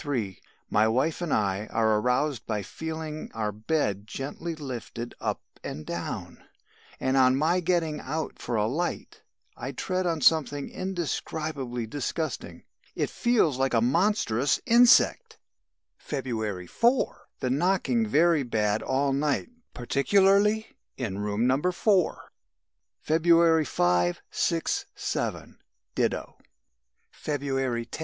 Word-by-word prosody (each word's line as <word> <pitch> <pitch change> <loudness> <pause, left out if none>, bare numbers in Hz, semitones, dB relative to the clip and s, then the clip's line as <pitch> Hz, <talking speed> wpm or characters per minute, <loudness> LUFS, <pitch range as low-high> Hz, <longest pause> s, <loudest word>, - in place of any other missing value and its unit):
My 110 +1 +3
wife 130 +10 0
and 170 -4 -2
I 100 0 0
are 110 -1 +2
aroused 125 +1 0
by 105 -2 -2
feeling 160 +3 -6
our 110 -2 -1
bed 105 -2 -1
gently 145 +8 -5
lifted 120 -4 -6
up - - -2 0.2
and 75 - -6
down, 85 0 -5 0.6
and 130 0 0
on 130 -1 +5
my 160 +6 +2
getting 165 -3 0
out 155 +4 -4
for 120 - -3
a 105 -1 +2
light, 155 +10 -3 0.3
I - - -6
tread 185 -1 -1
on 165 -2 -1
something 145 -1 +2
indescribably 155 -8 -3
disgusting. 145 +6 -4 0.3
It - - -1
feels 220 - +2
like 135 -2 +1
a - - +5
monstrous 135 - +2
insect!! 245 - +5 0.6
"February 110 -9 -3
4. 235 - +1
The 125 - -1
knocking 195 - +1
very 170 -4 +4
bad 110 -4 0
all 135 +1 0
night 145 - 0 0.3
particularly 200 - +2 0.2
in 105 -7 -3
room 105 +2 0
No. 130 +3 +2
4. 185 -1 +1 0.7
"February 165 0 +4
5, 90 -5 +1
6, - - 0
7, - - -3 0.3
ditto. - - -2 0.7
"February 135 -5 -2
10. 115 - -8
140 Hz, 120 wpm, -27 LUFS, 115-170 Hz, 0.7 s, on